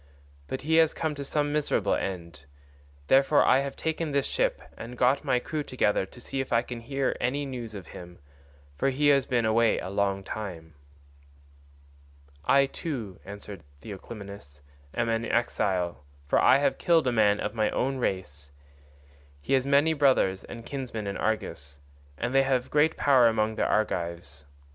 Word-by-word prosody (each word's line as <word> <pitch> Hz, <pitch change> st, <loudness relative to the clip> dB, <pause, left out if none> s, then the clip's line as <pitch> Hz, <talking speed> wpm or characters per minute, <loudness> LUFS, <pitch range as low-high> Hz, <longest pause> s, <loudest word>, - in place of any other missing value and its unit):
But 130 Hz, -, -4 dB
he 160 Hz, +2 st, +2 dB
has 160 Hz, -1 st, +4 dB
come 160 Hz, -2 st, -1 dB
to 140 Hz, -1 st, -6 dB
some 145 Hz, +1 st, -1 dB
miserable 140 Hz, -9 st, +1 dB
end. 85 Hz, -6 st, -4 dB, 0.6 s
Therefore 135 Hz, -, +4 dB
I 130 Hz, -, +5 dB
have 140 Hz, 0 st, -3 dB
taken 160 Hz, 0 st, -2 dB
this 140 Hz, -1 st, 0 dB
ship -, -, 0 dB, 0.2 s
and 120 Hz, +2 st, -9 dB
got 125 Hz, +3 st, +3 dB
my 125 Hz, -, +2 dB
crew 150 Hz, +5 st, -3 dB
together 105 Hz, -8 st, 0 dB
to 120 Hz, -, -14 dB
see 135 Hz, +2 st, -5 dB
if 135 Hz, -, -7 dB
I 115 Hz, 0 st, +3 dB
can 120 Hz, -1 st, -7 dB
hear 135 Hz, +3 st, -2 dB
any 140 Hz, +4 st, 0 dB
news 120 Hz, -5 st, -6 dB
of 95 Hz, -4 st, -8 dB
him, 90 Hz, +1 st, -11 dB, 0.6 s
for 105 Hz, -, +1 dB
he 145 Hz, +2 st, +2 dB
has 140 Hz, -2 st, +3 dB
been 120 Hz, -2 st, +1 dB
away 115 Hz, +1 st, +3 dB
a 90 Hz, -, -5 dB
long 100 Hz, -1 st, 0 dB
time." 90 Hz, -7 st, -7 dB, 1.7 s
"I 140 Hz, -, +4 dB
too," 130 Hz, -, -6 dB
answered 100 Hz, -2 st, -9 dB, 0.2 s
Theoclymenus, 100 Hz, -7 st, -10 dB, 0.3 s
"am 120 Hz, -1 st, 0 dB
an 115 Hz, 0 st, 0 dB
exile, 95 Hz, -8 st, -1 dB, 0.2 s
for 70 Hz, -, +2 dB
I 130 Hz, -, +6 dB
have 145 Hz, -, 0 dB
killed 165 Hz, -3 st, +3 dB
a 125 Hz, -, +2 dB
man 105 Hz, -3 st, +3 dB
of -, -, -3 dB
my 110 Hz, -2 st, +1 dB
own 135 Hz, +1 st, -1 dB
race. 75 Hz, -, -3 dB, 0.9 s
He 70 Hz, -, -3 dB
has 135 Hz, 0 st, +2 dB
many 145 Hz, +3 st, +4 dB
brothers 130 Hz, -10 st, +2 dB
and 115 Hz, -1 st, -10 dB
kinsmen 125 Hz, -6 st, -5 dB
in 100 Hz, -1 st, -3 dB
Argos, 75 Hz, -10 st, -3 dB, 0.4 s
and 125 Hz, -, -3 dB
they 135 Hz, -, +5 dB
have 130 Hz, -2 st, 0 dB
great 150 Hz, +2 st, +3 dB
power 130 Hz, -4 st, +5 dB
among 110 Hz, -1 st, +1 dB
the -, -, 0 dB
Argives. 85 Hz, -8 st, -2 dB
115 Hz, 170 wpm, -27 LUFS, 100-135 Hz, 1.7 s, I